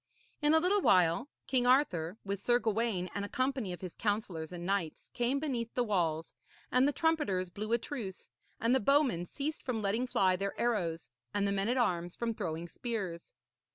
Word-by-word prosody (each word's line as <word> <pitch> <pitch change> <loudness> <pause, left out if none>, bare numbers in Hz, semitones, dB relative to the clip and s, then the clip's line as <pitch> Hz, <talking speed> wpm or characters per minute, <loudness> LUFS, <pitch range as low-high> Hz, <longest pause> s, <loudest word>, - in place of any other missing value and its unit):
In 300 +1 +4
a - - +7
little 385 +5 +3
while 180 - +4 0.2
King 250 -2 +1
Arthur, 195 - +2
with 200 0 -3
Sir 240 +3 +4
Gawaine 220 -5 0
and 200 - -2
a 205 - -5
company 255 -6 -1
of 175 - -6
his 185 -3 -7
counsellors 205 -7 -2
and 175 -1 -6
knights, 190 -5 -2
came 245 +3 +1
beneath 245 -6 -3
the 245 - +2
walls, 165 -7 0 0.4
and 255 +2 +4
the - - +3
trumpeters 280 - 0
blew 215 +4 -5
a 235 - +5
truce, 225 -7 -7 0.3
and 230 +2 +2
the 265 - +5
bowmen 260 - +2
ceased 295 - -4
from 250 -4 -2
letting 220 +6 +1
fly 185 -6 +3
their 200 +2 -3
arrows 170 - -1 0.2
and 200 0 +2
the - - +1
men 200 +2 0
at 250 - +1
arms 175 -7 0
from 235 -1 -1
throwing 165 -4 -4
spears. 195 -6 -4
210 Hz, 190 wpm, -32 LUFS, 180-250 Hz, 0.4 s, a